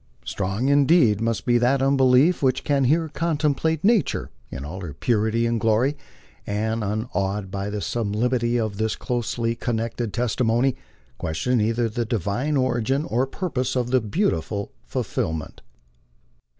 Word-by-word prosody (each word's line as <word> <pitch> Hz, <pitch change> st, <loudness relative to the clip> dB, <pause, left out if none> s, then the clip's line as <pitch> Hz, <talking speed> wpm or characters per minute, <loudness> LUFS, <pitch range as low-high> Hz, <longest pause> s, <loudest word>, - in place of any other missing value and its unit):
Strong 100 Hz, +6 st, -2 dB
indeed 140 Hz, -, +4 dB
must 115 Hz, -5 st, -1 dB
be 120 Hz, 0 st, +3 dB
that 125 Hz, +3 st, +3 dB
unbelief 135 Hz, +4 st, +4 dB
which 130 Hz, -2 st, +1 dB
can 140 Hz, -2 st, +2 dB
here 160 Hz, +5 st, +2 dB
contemplate 155 Hz, 0 st, 0 dB
nature 215 Hz, -, +2 dB, 0.2 s
in 65 Hz, +2 st, -6 dB
all 90 Hz, +6 st, -6 dB
her 80 Hz, -6 st, -7 dB
purity 110 Hz, -, +1 dB
and 115 Hz, -1 st, 0 dB
glory, 115 Hz, +6 st, +2 dB, 0.5 s
and, 110 Hz, +2 st, -1 dB
nnawed 105 Hz, -2 st, -2 dB
by 100 Hz, +1 st, -3 dB
the 105 Hz, 0 st, -4 dB
sub 110 Hz, -2 st, -2 dB
limity 120 Hz, +1 st, +1 dB
of 110 Hz, -3 st, -2 dB
this 110 Hz, 0 st, 0 dB
closely 120 Hz, -1 st, -2 dB
connected 115 Hz, -1 st, -3 dB
testimony, 120 Hz, +2 st, +1 dB, 0.4 s
question 115 Hz, +10 st, 0 dB
either 115 Hz, +2 st, +1 dB
the 120 Hz, +2 st, -2 dB
Divine 115 Hz, -, -1 dB
origin 130 Hz, +2 st, +1 dB
01 125 Hz, -2 st, 0 dB
purpose 130 Hz, -7 st, -2 dB
of 125 Hz, -1 st, -1 dB
the 130 Hz, -1 st, +3 dB
beautiful 105 Hz, -, -1 dB, 0.2 s
firmament. 80 Hz, -2 st, -3 dB
120 Hz, 140 wpm, -23 LUFS, 105-135 Hz, 0.5 s, indeed